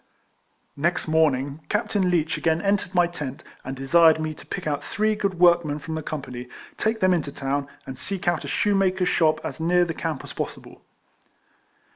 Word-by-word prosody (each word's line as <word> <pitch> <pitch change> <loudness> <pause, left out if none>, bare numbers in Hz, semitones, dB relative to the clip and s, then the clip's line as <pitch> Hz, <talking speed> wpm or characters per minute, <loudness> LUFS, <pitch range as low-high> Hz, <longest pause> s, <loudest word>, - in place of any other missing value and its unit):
Next 170 +5 0
morning 145 -3 +2
Captain 205 -3 +1
Leech 165 -3 +1
again 160 -1 +1
en 200 +2 +2
tered 195 -1 -6
my 175 -1 +5
tent, 150 -6 -6 0.2
and 135 - -5
desired 160 +4 +5
me 155 0 -2
to - - -15
pick 190 - -5
out 145 -2 -1
three 215 +1 0
good 200 -3 -1
workmen 170 -4 +4
from 155 +2 -6
the 160 - -3
company, 125 -5 -6 0.3
take 220 +1 -1
them 185 0 +4
into 155 -5 -1
the 140 - -11
town, 140 +1 -1 0.2
and 130 -1 -8
seek 195 -2 -4
out 175 -3 +1
a - - -6
shoemaker's 190 -3 +1
shop 155 -2 +3
as - - -5
near 175 +2 +3
the 165 - -3
camp 160 -3 -4
as - - -9
pos - - -3
sible. - - -15
165 Hz, 195 wpm, -24 LUFS, 145-185 Hz, 0.3 s, my